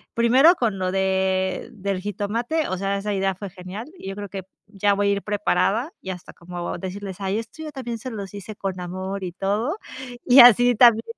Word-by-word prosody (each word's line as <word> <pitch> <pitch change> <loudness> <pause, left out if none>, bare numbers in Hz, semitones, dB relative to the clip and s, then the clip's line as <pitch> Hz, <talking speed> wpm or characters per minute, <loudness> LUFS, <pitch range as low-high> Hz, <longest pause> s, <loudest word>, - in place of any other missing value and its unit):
primero 255 +9 +6
con 225 - -1
lo 185 0 -1
de 190 0 0
del 195 -2 -3
jitomate, 230 - -2
o 185 - -2
sea, 195 +1 -1
esa 205 +1 -2
idea 195 -1 0
fue 200 +1 -7
genial 190 - -8
y 195 - -7
yo 195 - -5
creo 205 0 -6
que 195 0 -6
p 190 - -38 0.2
ya 205 0 +1
voy 200 0 +1
a - - +3
ir 200 - 0
preparada 210 +5 0
y 190 - -8
hasta 180 -2 -7
como 175 0 -6
decirles: 190 0 -6
“Ay, 195 +2 -1
esto 230 +8 -9
yo 305 - -6
también 245 -5 -5
se 255 - -6
los 205 -5 -7
hice 205 +1 -8
con 190 -2 -4
amor 185 +2 -5
y 180 - -4
todo”, 205 - -1 0.5
y 255 +2 +7
así, 245 +1 +8
también 230 -1 +6
200 Hz, 215 wpm, -23 LUFS, 190-230 Hz, 0.5 s, así